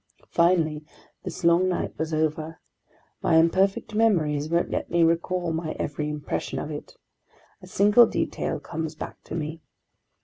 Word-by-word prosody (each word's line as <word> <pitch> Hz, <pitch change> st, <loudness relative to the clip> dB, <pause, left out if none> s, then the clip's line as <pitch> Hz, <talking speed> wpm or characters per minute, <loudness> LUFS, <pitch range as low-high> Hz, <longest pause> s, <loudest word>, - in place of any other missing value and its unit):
Finally 165 Hz, -3 st, +2 dB, 0.4 s
this 185 Hz, -1 st, -7 dB
long 170 Hz, +2 st, +4 dB
night 180 Hz, -, -2 dB
was 160 Hz, 0 st, -2 dB
over. 155 Hz, +1 st, -1 dB, 0.6 s
My -, -, +2 dB
imperfect 190 Hz, +6 st, +2 dB
memories 155 Hz, -10 st, +2 dB
won't 170 Hz, +1 st, +1 dB
let -, -, -2 dB
me 170 Hz, 0 st, +3 dB
recall 170 Hz, +1 st, +1 dB
my 160 Hz, -1 st, -3 dB
every 150 Hz, +1 st, -3 dB
impression 150 Hz, -1 st, -4 dB
of 150 Hz, -, -4 dB
it. 150 Hz, -, -8 dB, 0.6 s
A -, -, -12 dB
single 210 Hz, +4 st, +5 dB
detail -, -, -2 dB
comes 160 Hz, -1 st, -5 dB
back -, -, -8 dB
to -, -, -6 dB
me. 160 Hz, 0 st, -4 dB
165 Hz, 145 wpm, -25 LUFS, 155-180 Hz, 0.6 s, single